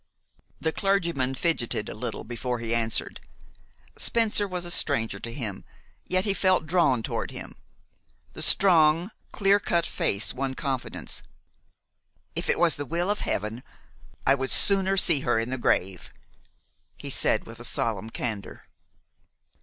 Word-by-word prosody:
The 160 - 0
clergyman 170 -10 0
fidgeted 145 -5 0
a - - -5
little - - -5
before 120 +2 -3
he 115 0 -3
answered. 115 -1 0 0.8
Spencer 220 -3 +2
was 180 -2 -3
a 175 - -4
stranger 140 -10 +1
to 115 - -6
him, 115 -6 -4 0.4
yet 185 +1 +2
he 200 - +2
felt 185 -3 +2
drawn 150 -8 +2
toward - - -3
him. - - -8 0.8
The - - -8
strong, 170 0 +5 0.2
clear 200 0 +3
cut 170 -4 0
face 100 +1 0
won 130 0 -3
confidence. 135 -3 -3 1.1
"If - - -3
it - - +2
was 170 -3 +3
the 145 - -3
will 175 +6 0
of 210 - -1
Heaven, 105 +4 -2 0.6
I 135 - +6
would 135 -1 -1
sooner 195 -1 +3
see 170 -5 +4
her 120 -3 +1
in 115 +2 -1
the 130 - -2
grave," 95 -5 0 0.9
he - - -4
said, - - +2
with - - -10
solemn 110 -1 -2
candor. 110 -4 -5
140 Hz, 145 wpm, -26 LUFS, 120-180 Hz, 1.1 s, I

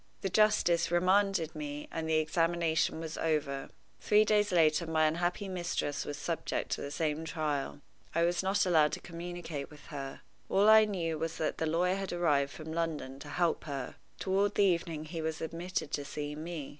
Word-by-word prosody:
The 195 - -1
justice 210 -5 +3
remanded 185 -1 +2
me 150 -1 -5
and 160 -1 -3
the 160 - +3
examination 165 0 +1
was 160 -1 -5
over. 145 -4 -1 0.3
Three 210 0 +4
days 210 -1 +3
later 165 -1 +3
my 160 -1 +3
unhappy 175 +5 0
mistress 175 -5 -2
was 145 - -5
subjected 165 +3 -3
to - - -3
the 140 - -4
same 155 +1 -1
trial. 145 - -2 0.3
I 170 - +3
was 175 +1 +2
not 195 +1 +2
allowed 160 -4 +4
to - - -2
communicate 170 -4 -6
with 150 -2 -15
her. 135 -1 -6 0.3
All 200 +2 +4
I 220 0 +8
knew 170 -6 -2
was 165 0 -3
that 155 - -2
the 160 - 0
lawyer 180 +4 +1
had 195 -1 -4
arrived 145 -5 +2
from 160 +1 -7
London 160 -5 -3
to - - -9
help 175 -3 0
her. 140 -4 -5 0.2
Toward 200 +1 +1
the 205 - +4
evening 170 -4 0
he 165 +1 -5
was 160 -1 -2
admitted 170 +3 -3
to 145 - -2
see 145 +1 -5
me. 155 -1 -6
165 Hz, 185 wpm, -31 LUFS, 155-180 Hz, 0.3 s, I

